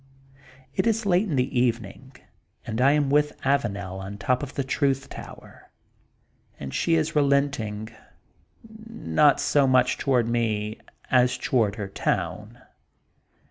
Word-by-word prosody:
It -, -, 0 dB
is 225 Hz, -1 st, +1 dB
late 190 Hz, +2 st, +2 dB
in 150 Hz, -, -1 dB
the 125 Hz, 0 st, 0 dB
evening, 120 Hz, +2 st, -2 dB, 0.5 s
and 110 Hz, +3 st, -3 dB
I 140 Hz, +2 st, +5 dB
am 145 Hz, -2 st, +1 dB
with 150 Hz, 0 st, +1 dB
Avanel 100 Hz, -9 st, -1 dB
on 95 Hz, +1 st, -7 dB
top 125 Hz, +4 st, 0 dB
of 145 Hz, -1 st, -7 dB
the 140 Hz, -, -1 dB
Truth 135 Hz, 0 st, 0 dB
Tower, -, -, -12 dB, 0.9 s
and 65 Hz, -1 st, -7 dB
she 165 Hz, -, +1 dB
is 160 Hz, 0 st, 0 dB
relenting, 140 Hz, -7 st, 0 dB, 0.8 s
not 215 Hz, -, +1 dB
so 140 Hz, -2 st, +2 dB
much 130 Hz, -1 st, +3 dB
toward 125 Hz, -4 st, +1 dB
me, 110 Hz, -2 st, -1 dB, 0.3 s
as 125 Hz, 0 st, +3 dB
toward 115 Hz, -5 st, +1 dB
her 105 Hz, -2 st, -5 dB
town. 105 Hz, +3 st, -3 dB
130 Hz, 135 wpm, -25 LUFS, 110-145 Hz, 0.9 s, I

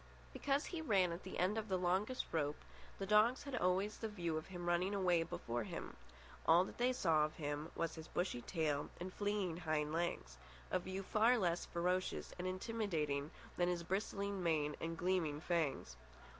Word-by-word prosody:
Because 280 Hz, +2 st, +1 dB
he 340 Hz, -3 st, -4 dB
ran 195 Hz, -, +3 dB
at 170 Hz, +2 st, -4 dB
the 190 Hz, -, -6 dB
end 195 Hz, +5 st, +2 dB
of 220 Hz, -, -5 dB
the 190 Hz, -2 st, +1 dB
longest 190 Hz, +8 st, +1 dB
rope, 150 Hz, -2 st, 0 dB, 0.4 s
the 195 Hz, -, -3 dB
dogs 215 Hz, +5 st, +4 dB
had 280 Hz, -2 st, -4 dB
always 190 Hz, 0 st, +1 dB
the 225 Hz, -, -2 dB
view 170 Hz, -6 st, -2 dB
of 155 Hz, -, -3 dB
him 175 Hz, -2 st, -6 dB
running 180 Hz, +3 st, +2 dB
away 180 Hz, -3 st, +3 dB
before 120 Hz, -7 st, -3 dB
them. -, -, -6 dB, 0.5 s
All 170 Hz, +2 st, +7 dB
that -, -, -10 dB
they 250 Hz, +1 st, +4 dB
saw 165 Hz, -11 st, +3 dB
of 155 Hz, +1 st, -2 dB
him 145 Hz, +1 st, -3 dB
was 165 Hz, -1 st, -1 dB
his 160 Hz, 0 st, -8 dB
bushy 175 Hz, -9 st, -1 dB
tail 150 Hz, -2 st, -1 dB
and 185 Hz, +1 st, -5 dB
fleeing 205 Hz, -5 st, -1 dB
hind 155 Hz, -3 st, 0 dB
legs—a 60 Hz, -, -3 dB
view 190 Hz, +2 st, -4 dB
far 225 Hz, +5 st, +4 dB
less 175 Hz, -5 st, 0 dB
ferocious 180 Hz, +2 st, -1 dB
and 180 Hz, -, -1 dB
intimidating 185 Hz, -8 st, -1 dB, 0.3 s
than 175 Hz, 0 st, +3 dB
his 175 Hz, -1 st, -1 dB
bristling 200 Hz, +1 st, -1 dB
mane 155 Hz, -3 st, +1 dB
and 165 Hz, 0 st, -3 dB
gleaming 175 Hz, -5 st, +1 dB
fangs. 160 Hz, -4 st, -1 dB
175 Hz, 180 wpm, -38 LUFS, 160-195 Hz, 0.5 s, All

